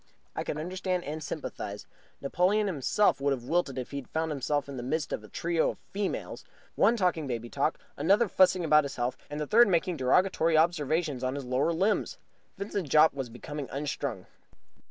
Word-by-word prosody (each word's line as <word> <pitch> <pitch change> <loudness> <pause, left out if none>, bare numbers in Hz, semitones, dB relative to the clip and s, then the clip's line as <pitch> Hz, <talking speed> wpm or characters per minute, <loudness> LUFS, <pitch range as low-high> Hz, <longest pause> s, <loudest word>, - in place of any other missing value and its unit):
I - - -2
could - - -4
understand 180 +2 -2
and 155 +2 -5
sympathize. 105 -9 -6 0.4
Napoleon 185 +9 +2
himself 185 0 +1
would 140 0 +2
have 125 -3 -5
wilted 145 -1 0
if 125 - -5
he 140 - -4
had 140 - -7
found 160 0 -1
himself 145 0 -1
in 140 - -7
the 125 - -4
midst 155 +5 -2
of 105 - -4
a - - -11
trio 165 - 0
of - - -6 0.2
females, 200 0 -3 0.3
one 235 - +3
talking 175 -7 0
baby 120 -2 -4
talk, 145 +3 0 0.2
another 200 +10 +3
fussing 185 -2 +3
about 150 -1 +5
his 140 -1 -5
health, 120 +1 -1
and 145 +1 -5
the 150 - -1
third 235 +10 +6
making 180 -1 +1
derogatory 160 +4 +3
observations 155 -3 +1
on 130 +1 -1
his 140 -2 -5
lower 130 +6 +1
limbs. 200 - 0 0.4
Vincent 200 -5 -3
Jopp 155 +3 +6
was 135 -3 -4
becoming 140 +4 -7
unstrung. 140 -7 -4
155 Hz, 190 wpm, -29 LUFS, 135-180 Hz, 0.4 s, third